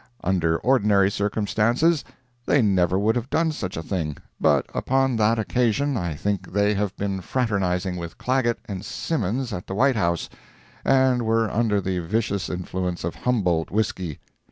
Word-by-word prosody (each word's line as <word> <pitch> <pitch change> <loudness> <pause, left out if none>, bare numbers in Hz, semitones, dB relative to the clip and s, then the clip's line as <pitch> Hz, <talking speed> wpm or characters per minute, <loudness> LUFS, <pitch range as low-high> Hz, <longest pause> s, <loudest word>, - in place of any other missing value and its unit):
Under 85 -3 +1
ordinary 105 -6 +3
circumstances, 110 +10 +1 0.4
they 140 - +4
never 95 -3 +2
would 110 +4 +2
have 120 +1 -2
done 160 0 +1
such 95 - -5
a 80 - -4
thing—but 80 -6 -1
upon 135 -1 +1
that 110 +1 +3
occasion 125 +5 +1
I 85 -8 -2
think 100 +5 -2
they 100 +1 +3
had 100 -1 -1
been 100 -1 -2
fraternizing 95 -6 -1
with 85 -1 -7
Clagett 125 -2 +1
and 100 -4 -6
Simmons 125 - -2
at 90 -1 -6
the 95 - -4
White 135 +4 +3
House, 85 -5 0 0.6
and 130 -2 +3
were 115 -1 +1
under 110 -2 +1
the 95 -1 -2
vicious 100 +1 -1
influence 90 0 -3
of 85 - -2
Humboldt 90 -10 0
whisky. 95 -6 -2
105 Hz, 155 wpm, -24 LUFS, 90-120 Hz, 0.6 s, they